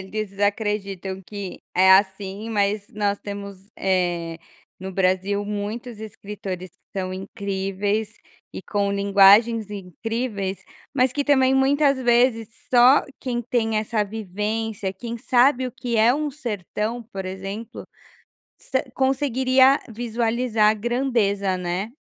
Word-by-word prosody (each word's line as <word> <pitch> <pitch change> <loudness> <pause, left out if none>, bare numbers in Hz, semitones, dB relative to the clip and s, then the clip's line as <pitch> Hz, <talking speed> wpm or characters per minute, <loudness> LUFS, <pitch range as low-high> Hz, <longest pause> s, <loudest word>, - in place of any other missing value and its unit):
eles 200 +1 -5
acreditam 200 -2 -2
que 200 -1 -7
é 190 +1 +5
assim, 195 +2 +1
mas 205 -1 0
nós 205 -2 0
temos, 200 -1 -8
eh, 175 -3 0 0.4
no 190 +1 -6
Brasil 190 +2 +1
muitos 210 +3 -5
escritores 200 -4 -7
que 195 - -11
são 185 -1 -3
incríveis 200 +2 -3 0.4
e - - -6
com 200 -1 -1
linguagens 200 +2 +5
incríveis, 200 +1 -4 0.3
mas 255 -2 +3
que 285 +1 -1
também 265 -2 +4
muitas 275 +1 +3
vezes 240 -2 +3 0.2
só 250 +3 +7 0.2
quem 245 -2 -2
tem 225 -2 0
essa 215 0 0
vivência, 210 0 -3
quem 235 +5 -6
sabe 255 +2 +3
o 250 - -6
que 235 0 -3
é 225 +2 +5
um 300 0 -2
"sertão", 230 - -4
por 195 -1 -5
exemplo, 195 +4 -6 0.8
sa 260 - -1
conseguiria 265 0 +3
visualizar 230 -1 +1
a - - 0
grandeza, 215 -5 0
né? 180 +3 -3
210 Hz, 125 wpm, -23 LUFS, 195-240 Hz, 0.8 s, só